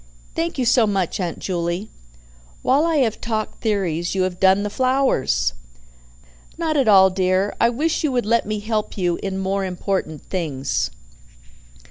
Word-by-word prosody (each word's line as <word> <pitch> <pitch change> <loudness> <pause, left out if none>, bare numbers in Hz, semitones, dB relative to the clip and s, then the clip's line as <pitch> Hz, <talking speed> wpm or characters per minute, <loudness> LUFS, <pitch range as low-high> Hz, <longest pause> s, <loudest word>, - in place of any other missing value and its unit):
"Thank 330 -1 -2
you 255 - 0
so 235 -1 +4
much, 195 -3 -1
Aunt 175 -3 -2
Juley. 175 +2 -3 0.7
While 285 +5 +3
I 330 - +1
have 220 -1 -3
talked 220 -2 -3
theories, 185 -5 -1
you 190 - +2
have 185 -1 -3
done 190 +1 +4
the 210 - -3
flowers." 255 - +1 1.0
"Not 325 -2 -1
at 270 -5 +2
all, 190 -2 +7
dear. 185 +1 +1
I 235 - +5
wish 305 +8 -1
you 300 - +1
would 245 -3 0
let 230 -1 +1
me 215 -1 -2
help 215 0 -2
you 175 -3 0
in 195 -1 -3
more 195 +1 -1
important 180 -4 -3
things." 150 -8 -2
200 Hz, 160 wpm, -21 LUFS, 185-235 Hz, 1.0 s, all